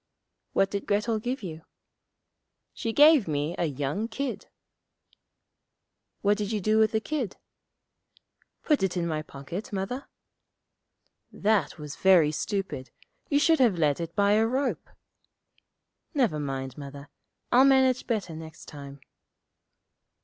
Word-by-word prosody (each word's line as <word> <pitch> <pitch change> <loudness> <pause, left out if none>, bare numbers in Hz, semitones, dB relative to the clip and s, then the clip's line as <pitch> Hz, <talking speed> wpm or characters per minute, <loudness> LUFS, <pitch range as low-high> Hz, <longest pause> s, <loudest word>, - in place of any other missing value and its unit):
'What 195 0 +2
did 200 -1 -4
Grettel 215 +2 +1
give 245 +2 -4
you?' 160 -3 -6 1.1
'She 225 - -3
gave 295 - +6
me 150 +1 -1
a 175 - +2
young 145 - -2
kid.' 270 +4 -4 1.7
'What 205 +1 +2
did 205 0 -2
you 215 - 0
do 215 +3 +2
with 220 0 +4
the 220 - +1
kid?' 255 -4 -3 1.3
'Put 300 -3 +2
it 190 -1 0
in 170 - 0
my 155 -2 -1
pocket, 155 +8 -7
Mother.' 205 +7 -4 1.2
'That 205 -7 +1
was 150 -1 -8
very 180 -6 +5
stupid. 190 -5 -3 0.4
You 285 - +3
should 320 +2 +4
have 230 -8 +4
led 150 -2 +2
it 170 0 -5
by 200 -1 +3
a 220 +2 +4
rope.' 265 +4 -1 1.3
'Never 235 - +2
mind, 135 -2 -4
Mother; 140 0 -9 0.4
I'll 250 +2 +7
manage 265 -2 +4
better 205 -8 -2
next 160 0 -10
time.' 140 -1 -10
195 Hz, 130 wpm, -27 LUFS, 155-230 Hz, 1.7 s, I'll